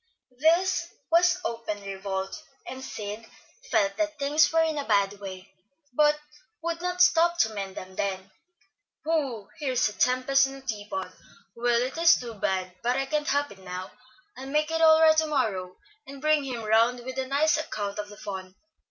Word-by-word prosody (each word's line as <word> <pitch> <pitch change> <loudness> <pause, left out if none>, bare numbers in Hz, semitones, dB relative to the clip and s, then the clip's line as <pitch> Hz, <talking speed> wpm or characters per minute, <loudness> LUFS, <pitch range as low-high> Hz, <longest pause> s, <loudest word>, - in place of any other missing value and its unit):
This 340 +3 +3 0.2
was 355 +2 +4
open 230 -3 -4
revolt, 195 +5 -4 0.2
and 260 0 -7
Sid 210 -2 -6 0.5
felt 200 -2 +2
that 310 -1 -1
things 290 +2 +3
were 325 0 +4
in 315 -2 -1
a - - -2
bad 200 -2 +2
way, 190 -1 -9 0.4
but 300 +2 +4 0.4
would 335 0 -2
not 360 0 +2
stop 345 0 +4
to 220 -10 +2
mend 195 -2 -5
them 185 0 -8
then. 190 -1 -3 0.7
"Whew! 275 -10 -1
here's 260 -6 +1
a - - -9
tempest 255 +3 +3
in 270 - -8
a 270 - -11
teapot. 205 -6 -5 0.4
Well, 240 0 +2
it 265 +6 -4
is 335 0 +6
too 240 -2 -7
bad; 185 -3 -2
but 245 +2 +1
I 270 - 0
can't 295 +2 -1
help 285 +1 +1
it 195 - -13
now. 185 0 -7 0.4
I'll 265 - -8
make 300 +3 0
it 325 0 0
all 320 0 +7
right 315 -1 +7
to 315 0 +3
morrow, 205 -11 -1 0.3
and 275 0 -9
bring 305 0 +2
him 245 -4 -4
round 230 +3 +3
with 260 +2 -5
a 260 - -2
nice 290 +3 +2
account 210 -9 -4
of 205 0 -5
the 205 - -12
fun. 190 -2 -7
255 Hz, 185 wpm, -27 LUFS, 205-305 Hz, 0.7 s, all